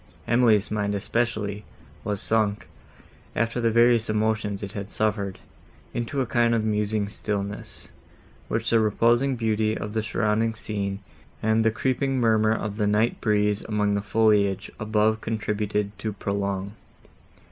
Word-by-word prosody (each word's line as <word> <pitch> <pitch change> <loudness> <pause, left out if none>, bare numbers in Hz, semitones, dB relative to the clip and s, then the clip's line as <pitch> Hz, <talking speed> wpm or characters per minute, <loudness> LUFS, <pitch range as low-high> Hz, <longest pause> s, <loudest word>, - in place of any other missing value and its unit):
—Emily's 115 -4 +3
mind, 105 -1 0
especially, 105 -1 -1 0.4
was 105 -1 -2
sunk, 110 -1 0 0.7
after 115 +2 0
the 115 - +3
various 115 0 +4
emotions 110 -1 0
it 100 - -5
had 100 0 -6
suffered, 100 -3 -1 0.6
into 120 +4 -2
a - - 0
kind 115 -1 +2
of 110 - +1
musing 105 -1 0
stillness, 100 0 -5 0.6
which 115 0 -1
the 115 - +5
reposing 120 +5 +2
beauty 110 -1 0
of 105 0 -5
the 110 - 0
surrounding 110 +1 0
scene 100 -2 -3 0.4
and 110 +1 +3
the 115 - +4
creeping 130 +3 0
murmur 110 -2 +3
of 110 -2 -2
the 105 -2 +1
night 110 +3 +1
breeze 105 -1 +2
among 105 -2 0
the 100 - 0
foliage 105 -2 +2
above 110 0 +1
contributed 105 -2 -2
to 110 - -2
prolong. 100 -1 -2
110 Hz, 140 wpm, -25 LUFS, 105-115 Hz, 0.7 s, the